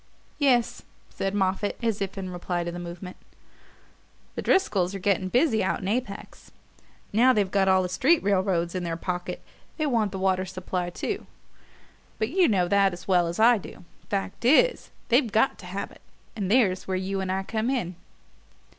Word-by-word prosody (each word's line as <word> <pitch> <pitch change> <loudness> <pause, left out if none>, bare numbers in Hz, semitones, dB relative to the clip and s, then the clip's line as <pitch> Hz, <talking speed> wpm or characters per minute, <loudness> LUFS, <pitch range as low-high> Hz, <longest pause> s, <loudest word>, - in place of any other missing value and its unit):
"Yes," 250 -5 +2 0.3
said 195 +1 -3
Moffatt, 195 +1 0
as 225 -3 0
if 195 0 -3
in 185 -1 -5
reply 175 0 -3
to 170 - -4
the 175 - -6
movement, 175 +1 -8 1.2
"the - - -4
Driscolls 200 - +1
are - - -2
getting 190 -1 0
busy 245 - +2
out 175 -2 -1
in 185 - -4
Apex. 215 -2 -4 0.6
Now 250 +4 +5
they've 200 -4 0
got 195 -1 +2
all 190 0 +4
the - - -1
street 270 - +2
railroads 190 -3 +1
in 185 -1 -3
their 165 -1 -3
pocket 180 +1 -4 0.3
they 310 - 0
want 230 -8 +1
the 190 - -5
water 190 -1 +1
supply 180 -1 -4
too 175 - -4 0.9
but 220 - -1
you 360 +4 +3
know 185 -5 +2
that 195 0 +3
as 175 - -10
well 180 -3 +3
as 170 +3 -4
I 230 0 +6
do. 180 - -12 0.2
Fact 195 +1 -3
is, 400 - +4 0.2
they've 245 -2 +3
got 220 +6 +2
to - - -11
have 195 +2 -5
it; - - -17 0.3
and 200 -4 -3
there's 205 -6 +2
where 190 -1 -1
you 190 +1 -2
and 190 -1 -2
I 190 +1 -1
come 220 +4 -2
in." 235 -10 -1
195 Hz, 185 wpm, -26 LUFS, 185-225 Hz, 1.2 s, I